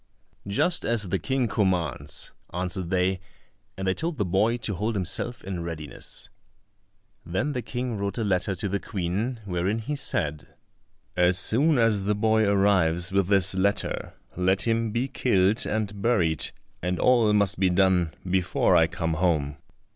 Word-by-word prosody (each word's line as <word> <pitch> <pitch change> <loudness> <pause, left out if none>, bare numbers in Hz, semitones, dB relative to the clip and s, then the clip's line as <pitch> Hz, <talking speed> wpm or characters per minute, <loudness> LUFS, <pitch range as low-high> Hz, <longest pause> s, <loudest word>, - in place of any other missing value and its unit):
"Just 160 - +1
as 110 -5 +1
the 95 +1 0
King 130 -2 0
commands," 85 - -1 0.2
answered 90 0 -3
they, 95 0 +1 0.6
and 95 0 -3
they 95 - +3
told 165 - -4
the 105 - 0
boy 105 +6 +1
to 110 -3 -3
hold 105 +5 -2
himself 95 +6 -2
in 95 -2 -4
readiness. 80 -3 -7 0.9
Then 110 - -2
the 125 - -2
King 125 -2 -4
wrote 100 0 -3
a 115 - -1
letter 95 -1 0
to 95 +4 -3
the 100 +1 -1
Queen, 105 +6 -3
wherein 95 +3 -1
he 115 +7 -3
said, 75 - -3 0.6
"As 90 0 +4
soon 140 +10 +3
as 110 -4 +2
the 105 +1 +1
boy 110 +1 +2
arrives 95 -4 +3
with 100 -2 +2
this 95 -1 +3
letter, 95 -2 -1 0.2
let 95 +1 +1
him 115 0 0
be 120 +5 -1
killed 105 -6 +2
and 105 -2 -2
buried, 85 -9 +1 0.3
and 90 +1 -2
all 120 -4 +4
must 100 -4 +2
be 95 -1 +3
done 90 -2 +2 0.2
before 90 -1 +2
I - - +5
come 80 0 -2
home." 75 -4 0
95 Hz, 160 wpm, -26 LUFS, 90-110 Hz, 0.9 s, I